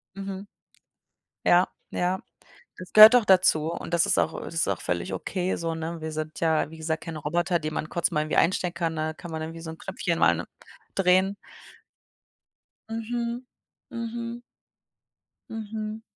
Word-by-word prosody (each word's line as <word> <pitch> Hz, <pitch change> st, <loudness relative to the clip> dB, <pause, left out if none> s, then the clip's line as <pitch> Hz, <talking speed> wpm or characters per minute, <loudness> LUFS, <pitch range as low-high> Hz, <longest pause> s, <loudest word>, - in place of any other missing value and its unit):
Mhm. 195 Hz, 0 st, -6 dB, 1.0 s
Ja, 175 Hz, +1 st, +5 dB, 0.2 s
ja. 180 Hz, +1 st, 0 dB, 0.6 s
Das 185 Hz, -1 st, -10 dB
gehört 215 Hz, +3 st, +11 dB
auch 235 Hz, -, +4 dB
dazu 170 Hz, -4 st, +4 dB
und 170 Hz, -, -4 dB
das 170 Hz, -, +3 dB
ist -, -, +2 dB
auch -, -, +1 dB
ähm, -, -, -6 dB
das -, -, -8 dB
ist 165 Hz, -, +1 dB
auch 95 Hz, -, -1 dB
völlig 90 Hz, +2 st, -2 dB
okay 185 Hz, -, -2 dB
so, 165 Hz, -1 st, -2 dB
ne? 165 Hz, +1 st, -5 dB
Wir 160 Hz, 0 st, -5 dB
sind 155 Hz, 0 st, -5 dB
ja, 160 Hz, -2 st, +2 dB
wie 160 Hz, -, -10 dB
gesagt, 160 Hz, 0 st, -3 dB
kein 165 Hz, -2 st, -6 dB
Roboter, 170 Hz, +4 st, 0 dB
die 155 Hz, 0 st, -4 dB
man 155 Hz, 0 st, -3 dB
kurz 170 Hz, 0 st, 0 dB
mal 150 Hz, -2 st, +1 dB
irgendwie 155 Hz, -, -2 dB
einstecken 180 Hz, 0 st, +2 dB
kann, 165 Hz, -2 st, -1 dB
ne? 155 Hz, -, -3 dB
Da -, -, -3 dB
kann 170 Hz, +1 st, -10 dB
man 160 Hz, 0 st, -4 dB
dann 160 Hz, -, -4 dB
irgendwie 165 Hz, 0 st, -9 dB
so 160 Hz, -, -6 dB
'n 160 Hz, -, -10 dB
Knöpfchen 170 Hz, -2 st, -2 dB
mal 85 Hz, 0 st, +3 dB, 0.5 s
drehen. 190 Hz, +1 st, +3 dB, 1.5 s
Mhm, 235 Hz, +2 st, -3 dB, 0.5 s
mhm. 235 Hz, 0 st, -5 dB, 1.1 s
Mhm. 220 Hz, 0 st, -5 dB
170 Hz, 175 wpm, -26 LUFS, 160-200 Hz, 1.5 s, gehört